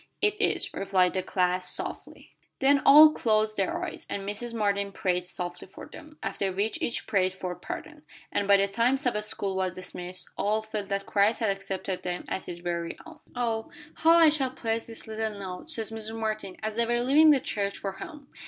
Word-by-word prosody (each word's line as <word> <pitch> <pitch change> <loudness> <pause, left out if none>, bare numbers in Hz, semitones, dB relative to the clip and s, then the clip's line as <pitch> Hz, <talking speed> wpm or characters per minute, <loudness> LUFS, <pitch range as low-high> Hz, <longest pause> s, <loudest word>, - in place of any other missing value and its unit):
"It 420 0 +1
is," - - 0
replied 190 -2 +2
the 185 - 0
class, 180 0 0
softly. - - -6 0.2
Then 280 +1 +4
all 305 +2 +10
closed 215 -5 +1
their 195 -2 -1
eyes, - - -8
and 200 -1 -4
Mrs. 220 +4 -4
Martin 200 -3 0
prayed 180 -2 -1
softly 175 0 -6
for 190 - -11
them, 305 0 -13
after 195 -1 -2
which 200 +4 -2
each 235 - -1
prayed 185 -2 +1
for 185 -1 -4
pardon, - - -8 0.3
and 200 - 0
by 200 0 +7
the 195 0 +2
time 235 +6 +2
Sabbath 245 -7 0
school 195 -2 -1
was 185 -1 -1
dismissed, 180 0 -6
all 215 +2 +1
felt 215 -2 -5
that 195 0 -1
Christ 205 +2 +2
had 220 -3 +2
accepted 195 -1 -4
them 180 0 -4
as - - -3
His 175 - -5
very 170 -1 -3
own. 325 -2 -13 0.2
"Oh, 230 -2 -1 0.3
how 325 +1 +5
I 325 -2 +8
shall 285 -4 +1
prize 230 -3 -3
this 225 -1 -8
little 220 -1 -3
note," 190 - -7
said 230 -8 -2
Mrs. 220 0 -5
Martin, 215 -4 -3
as 215 0 -2
they 235 0 +2
were 240 0 +1
leaving 290 +5 +6
the 290 -3 +6
church 200 -4 -2
for 195 - -4
home. 285 - -10
210 Hz, 200 wpm, -27 LUFS, 190-235 Hz, 0.3 s, all